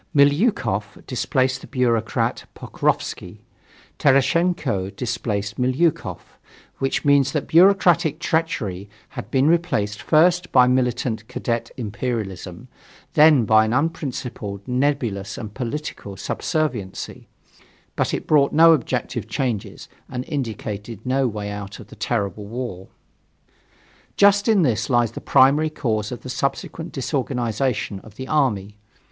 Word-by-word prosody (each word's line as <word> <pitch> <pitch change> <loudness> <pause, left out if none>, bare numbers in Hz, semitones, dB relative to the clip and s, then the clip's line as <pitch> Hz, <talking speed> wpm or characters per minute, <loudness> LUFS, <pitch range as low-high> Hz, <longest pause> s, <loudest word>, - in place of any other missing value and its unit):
Milyukov 140 - +2
displaced 130 0 0
the - - -11
bureaucrat 115 -4 0
Pokrovsky; - - -2 0.6
Tereshtchenko 135 - +2
displaced 115 -3 -3
Milyukov 130 +6 -1 0.4
which 135 +3 -1
means 140 -2 +4
that 150 - -1
bureaucratic 175 -3 +4
treachery 105 - -2 0.2
had 100 - -8
been 130 +2 +2
replaced 160 -12 +1
first 175 +3 +3
by 125 - +6
militant 125 -3 0
Cadet 115 -1 -3
imperialism, 105 -3 -4 0.5
then 150 -5 +6
by 110 0 +5
an 110 +1 -1
unprincipled, 125 -8 -3
nebulous 125 -7 -1
and 105 -2 -7
political 120 -5 -5
subserviency; 120 - -3 0.7
but - - 0
it - - -3
brought 145 -2 +4
no 165 +1 +7
objective 145 -7 -2
changes, 120 -7 -3 0.2
and 125 0 -4
indicated 110 - -5
no 130 +1 +1
way 105 -2 -4
out 100 -1 -7
of - - -12
the - - -12
terrible 105 -3 -2
war. 115 -5 -6 1.3
Just 200 +1 +5
in 210 -5 +4
this 110 -6 0
lies 120 -3 +2
the - - -8
primary 145 +4 +4
cause 110 -8 -2
of 125 - -6
the - - -9
subsequent 140 +6 -3
disorganization 125 -5 -2
of 105 0 -16
the 130 +2 -7
army. 105 -9 0
125 Hz, 120 wpm, -22 LUFS, 110-145 Hz, 1.3 s, no